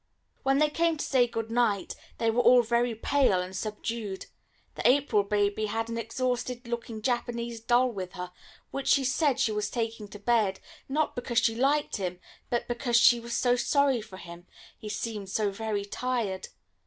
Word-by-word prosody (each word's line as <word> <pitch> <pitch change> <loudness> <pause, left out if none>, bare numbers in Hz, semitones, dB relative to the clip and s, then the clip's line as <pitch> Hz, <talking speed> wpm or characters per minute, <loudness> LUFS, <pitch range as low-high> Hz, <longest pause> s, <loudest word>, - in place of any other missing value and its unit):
When 270 0 +2
they 300 +1 +3
came 330 +1 +1
to - - -3
say 250 -3 +3
good 225 -1 -4
night, 230 -5 +1 0.2
they 230 -1 +2
were 240 +2 +2
all 245 0 +6
very 235 0 +1
pale 255 -4 +2
and 180 +1 -5
subdued. 215 -1 -4 0.5
The - - +2
April 260 -5 +3
baby 205 +1 0
had 225 +2 -2
an 230 - -3
exhausted 245 +1 -2
looking 235 -2 -5
Japanese 235 -1 -2
doll 245 +2 +3
with 185 -4 -6
her, 180 -1 -6 0.4
which 275 - -4
she 275 - +4
said 265 +1 +1
she 225 - +2
was 210 0 -1
taking 225 -3 -3
to 205 - -10
bed, 205 -3 +1 0.3
not 300 +3 0
because 245 -1 -3
she 225 - +4
liked 275 +5 +1
him, 180 -2 -4 0.3
but 240 - -1
because 240 0 +1
she 240 +1 +6
was 235 0 -3
so 245 -1 +3
sorry 275 -1 +2
for 190 -3 -11
him, 175 0 -11 0.3
he 215 - -9
seemed 210 -3 -4
so 205 0 0
very 205 0 -3
tired. 220 -4 -2
230 Hz, 180 wpm, -28 LUFS, 210-250 Hz, 0.5 s, all